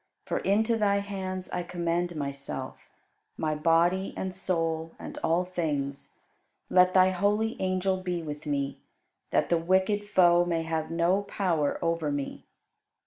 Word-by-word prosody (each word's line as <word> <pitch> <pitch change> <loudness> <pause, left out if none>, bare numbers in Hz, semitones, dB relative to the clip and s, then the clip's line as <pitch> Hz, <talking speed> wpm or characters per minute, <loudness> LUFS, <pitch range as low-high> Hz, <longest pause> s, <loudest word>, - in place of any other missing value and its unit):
For - - -1
into 220 +4 +2
Thy 205 -2 +2
hands 190 -2 -4
I 180 - -1
commend 175 0 -2
myself, 140 -2 -5 0.5
my 155 -1 0
body 170 +5 +2
and 190 -1 -3
soul, 165 -3 -1
and - - -8
all 170 +3 +2
things. 145 -6 -3 0.5
Let 185 0 +5
Thy 185 0 +6
holy 205 +4 +1
angel 185 0 +1
be 180 -2 -3
with 150 0 -7
me, 140 -1 -2 0.5
that - - +1
the 170 - +3
wicked 190 +4 +1
Foe 175 -3 +5
may 170 -2 -1
have 160 -1 -2
no 170 +4 +2
power 175 -7 0
over 165 -3 0
me. 145 -1 -4
175 Hz, 140 wpm, -28 LUFS, 160-190 Hz, 0.5 s, Thy